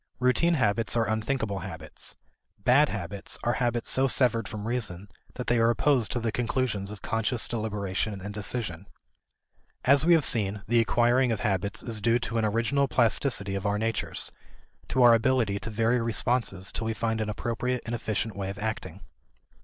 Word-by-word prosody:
Routine 130 +7 +3
habits 115 -3 +1
are 115 - +2
unthinking 110 -1 -1
habits: 80 -4 -4 0.4
"bad" 130 +8 +4
habits 100 0 -4
are 120 - +1
habits 120 -1 0
so 135 +1 +3
severed 120 -5 +3
from 105 +2 -6
reason 105 -6 -2 0.3
that 125 - -5
they 120 -1 +2
are 115 0 +4
opposed 120 +1 +2
to 120 - -1
the 115 -1 -1
conclusions 115 -4 -1
of 105 -1 -9
conscious 115 +1 0
deliberation 105 -2 -2
and 100 +2 -7
decision. 100 -4 -2 1.0
As 140 +2 +5
we 170 +1 +6
have 160 - +2
seen, 105 -3 +1
the 120 +1 +3
acquiring 120 +2 +3
of 110 - -2
habits 100 -1 -1
is 110 -3 0
due 115 +2 +3
to 115 -1 -2
an 110 - +1
original 115 +6 +1
plasticity 115 -3 +1
of 100 +1 -2
our 100 0 +1
natures: 110 0 -2 0.6
to 130 - +2
our 120 -1 +8
ability 115 -3 +2
to 115 - -5
vary 115 +2 +1
responses 115 -4 0
till 115 - -3
we 110 - -2
find 110 -1 -1
an 110 - -2
appropriate 120 +3 -2
and 120 - -4
efficient 110 -2 -2
way 95 -1 -4
of 100 - -6
acting. 110 +1 -5
115 Hz, 175 wpm, -27 LUFS, 105-120 Hz, 1.0 s, our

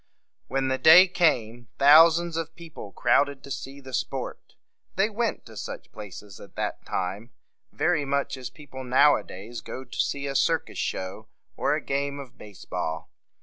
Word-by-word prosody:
When 135 0 -1
the 130 0 0
day 180 +4 +9
came, 120 - +1
thousands 165 +4 +6
of 165 0 -4
people 160 - -10
crowded 140 +5 +2
to 140 - -10
see 135 +1 -6
the 130 -2 -12
sport. - - -4 0.4
They 195 +4 +2
went 230 +2 -2
to 110 - -13
such - - -7
places 105 -1 -10
at - - -14
that - - -3
time 95 +6 -3 0.4
very 170 -4 +1
much 140 0 -1
as 130 -2 -7
people 130 -3 -10
now 135 +4 +5
a - - -3
days 110 +5 -9
go 130 - -7
to 125 - -10
see 140 0 0
a 140 - -3
circus - - 0
show 95 +4 -4 0.3
or - - +1
a - - -3
game 140 +1 -1
of 130 -4 -10
base 105 -3 -13
ball. 80 +1 -4
135 Hz, 175 wpm, -26 LUFS, 115-155 Hz, 0.4 s, day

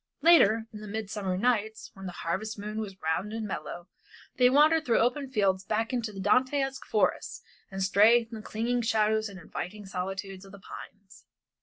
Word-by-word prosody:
Later, 230 -10 +6
in 210 - -8
the 215 - -8
midsummer 205 -3 -3
nights, 220 -1 0
when 195 -1 -9
the - - -5
harvest 195 +7 -2
moon 210 +1 -5
was 195 -3 -6
round 160 +6 -1
and 225 -1 -3
mellow, 175 -1 -6 0.5
they 250 0 +6
wandered 305 +4 +5
through 235 -6 +2
the - - +4
open 265 +3 -1
fields 195 -6 +1
back 220 +4 -1
into 235 -3 -2
the 195 - -9
Dantesque 265 +6 +1
forests 215 - 0 0.3
and 195 0 -3
strayed 225 +5 +4
in - - -6
the - - -8
clinging 235 +3 -1
shadows 220 -1 +1
and 195 -2 -10
inviting 200 +4 -7
solitudes 190 +1 -5
of 195 0 -14
the 200 - -11
pines. 195 -1 -12
215 Hz, 185 wpm, -28 LUFS, 195-235 Hz, 0.5 s, Later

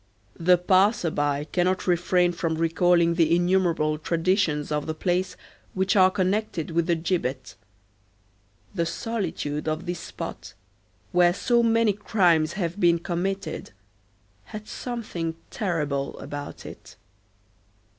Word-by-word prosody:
The 180 +2 +5
passer 185 0 +3
by 145 -1 0
cannot 180 +4 0
refrain 175 0 +2
from 165 -2 -2
recalling 170 +1 +3
the 165 -1 +3
innumerable 175 -4 +1
traditions 165 -2 0
of 150 0 -1
the 155 - -3
place 180 +3 -1 0.4
which 190 +1 +1
are 185 -2 +6
connected 185 -2 -1
with 170 0 0
the 170 - +3
gibbet. 160 -6 -2 1.2
The 170 -4 -1
solitude 170 -10 -3
of 155 +3 -2
this 175 0 -3
spot, - - -8 0.6
where 175 -1 +4
so 235 +3 +2
many 230 -2 +3
crimes 175 -6 +2
have 180 -1 -3
been 170 -3 +4
committed, 175 - -4 0.7
had 215 - -9
something 195 -10 -4 0.2
terrible 150 -8 -2
about 145 0 -7
it. - - -11
175 Hz, 120 wpm, -25 LUFS, 160-190 Hz, 1.2 s, are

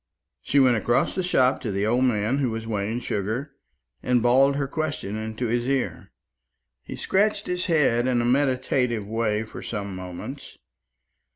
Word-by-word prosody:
She 145 - +2
went 125 -3 +5
across 120 +3 +1
the 185 - -1
shop 130 -8 +2
to 115 - -3
the 100 +1 -1
old 120 +4 +2
man 115 +2 +1
who 130 -3 +1
was 115 0 -4
weighing 110 +2 -2
sugar, 115 +7 -3 0.5
and 125 -2 +1
bawled 135 +3 +4
her 140 -1 -1
question 145 -9 -3
into 110 +2 -4
his 120 +1 0
ear. 135 -1 -2 0.7
He - - -8
scratched 205 +1 +1
his 180 0 -2
head 135 -8 +2
in 125 -2 +2
a 120 - 0
meditative 125 -3 +1
way 110 0 -1
for 110 - -9
some 100 -3 -5
moments. 90 -1 -8
120 Hz, 165 wpm, -25 LUFS, 110-135 Hz, 0.7 s, went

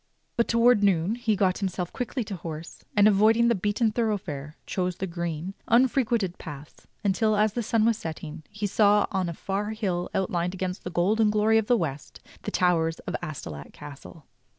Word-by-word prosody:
But 235 - +2
towards 235 -1 +4
noon 190 -1 +2
he 230 -3 0
got 185 -2 +1
himself 185 -3 -3
quickly 250 0 -3
to 205 -2 -6
horse, 165 -1 -8
and, 205 0 +7
avoiding 220 +3 +4
the - - +4
beaten 210 +3 +1
thoroughfare, 190 - -3
chose 180 -1 -2
the 190 - -3
green, 170 0 -4
unfrequented 235 -6 +2
paths 150 -2 -10 0.2
until, 215 +2 +2
as 210 0 +2
the 240 - -1
sun 225 0 +1
was 230 -1 +2
setting, 160 -3 -6
he 205 0 -4
saw 205 0 +4
on 190 -3 0
a - - -4
far 205 +5 -3
hill 185 -5 -2
outlined 180 -1 -1
against 185 0 -4
the - - -4
golden 210 +5 +2
glory 215 +1 +3
of 215 - -3
the 245 - +4
west 150 -7 -4 0.2
the - - -4
towers 165 -3 +2
of - - -4
Astolat 85 - -7
Castle. 145 +2 -11
195 Hz, 180 wpm, -26 LUFS, 170-220 Hz, 0.2 s, and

